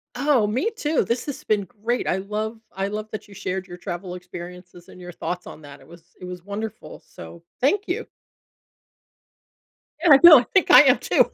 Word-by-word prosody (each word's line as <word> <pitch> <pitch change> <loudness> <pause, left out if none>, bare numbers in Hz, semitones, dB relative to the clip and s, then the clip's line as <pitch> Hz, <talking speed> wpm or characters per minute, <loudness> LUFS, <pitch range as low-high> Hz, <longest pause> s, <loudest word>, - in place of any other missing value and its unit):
Oh, 270 -8 +2
me 260 - -1
too, 310 -8 -1
this 235 +2 -2
has 285 - -7
been 205 -2 0 0.2
great. 240 +2 -1
I 180 - +1
love 215 +3 -4 0.2
I 195 +1 -2
love 215 +1 -6
that 215 - -7
you 200 - -15
shared 185 0 -5
your 175 -1 -10
travel 180 +1 -6
experiences 180 0 -11
and - - -14
your 175 0 -9
thoughts 180 +1 -5
on 155 - -11
that. 145 -1 -13
It - - -19
was 170 +1 -18
it 180 - -9
was 180 -1 -8
wonderful. 210 +2 -7
So 170 - -13 0.2
thank 395 +10 +1
you. - - -3 2.0
Yeah, 340 - +4
I 275 - +7
know, 320 -5 +11
I 240 - -4
think 385 - +3
I - - +10
am - - +4
too. - - +2
200 Hz, 200 wpm, -23 LUFS, 180-240 Hz, 2.0 s, know